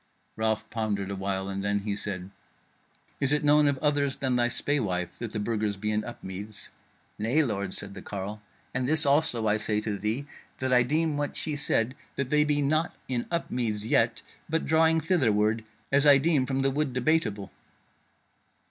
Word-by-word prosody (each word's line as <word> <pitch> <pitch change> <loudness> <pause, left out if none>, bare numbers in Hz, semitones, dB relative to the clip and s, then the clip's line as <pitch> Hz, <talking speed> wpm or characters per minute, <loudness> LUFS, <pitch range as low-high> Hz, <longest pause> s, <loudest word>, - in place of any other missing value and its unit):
Ralph 110 -1 0
pondered 105 -4 -2
a - - -3
while, 95 0 -2
and 100 0 -3
then 100 0 0
he 100 0 -2
said: 95 -2 -4 0.9
"Is 140 -1 +2
it 150 0 +2
known 150 0 +5
of 140 -1 +1
others 145 -2 +2
than 130 -2 0
thy 120 -1 +3
spaewife 105 -10 -1
that 120 -2 -4
the 110 - -3
Burgers 105 -1 -1
be 105 +2 -2
in 105 0 0
Upmeads?" 105 -2 -7 0.5
"Nay, 120 +9 +2
lord," 100 -7 -2
said 100 0 -6
the 95 - -8
carle, 105 +2 -6 0.3
"and 130 0 -1
this 155 +1 +5
also 140 -5 +2
I 105 +1 +3
say 105 0 0
to 105 -2 -3
thee, 110 +7 -1 0.3
that 130 -1 0
I 125 - +6
deem 155 +4 +1
what 145 0 -3
she 155 -2 -2
said 130 -4 +1 0.2
that 140 -1 -3
they 150 0 +5
be 145 -1 +1
not 155 +4 +1
in 125 -2 -2
Upmeads 120 -10 -1
yet, 115 0 +2 0.2
and - - -35
but 160 +1 0
drawing 160 0 +4
thitherward, 110 - +2 0.3
as 140 +2 +4
I 140 -1 +9
deem 140 -2 +2
from 135 0 0
the 135 - +2
Wood 145 -1 -1
Debateable." 120 -7 0
120 Hz, 185 wpm, -27 LUFS, 105-145 Hz, 0.9 s, I